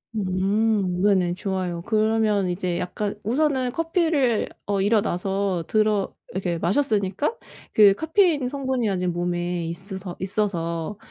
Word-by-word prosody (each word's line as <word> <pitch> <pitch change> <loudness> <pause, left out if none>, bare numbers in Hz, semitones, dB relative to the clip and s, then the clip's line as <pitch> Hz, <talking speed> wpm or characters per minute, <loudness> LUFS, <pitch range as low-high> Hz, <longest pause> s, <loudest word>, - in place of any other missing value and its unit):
음. 195 -1 +1
네네. 185 -4 +3
좋아요. 185 -3 -3
그러면 215 -2 +2
이제 180 -1 -2
약간 205 +3 -3
우선은 260 +1 +1
커피를 320 - +1 0.2
어 200 -1 0
일어나서 195 -3 0
들어 215 -2 +1 0.2
이렇게 180 -2 -2
마셨으니까 205 - 0 0.4
그 205 -2 +7
카페인 320 - +2
성분이 260 -4 -1
아직 180 -2 -1
몸에 175 0 -2
있으서 185 +1 -6
있어서 185 -2 -2
200 Hz, 275 characters per minute, -24 LUFS, 180-225 Hz, 0.4 s, 그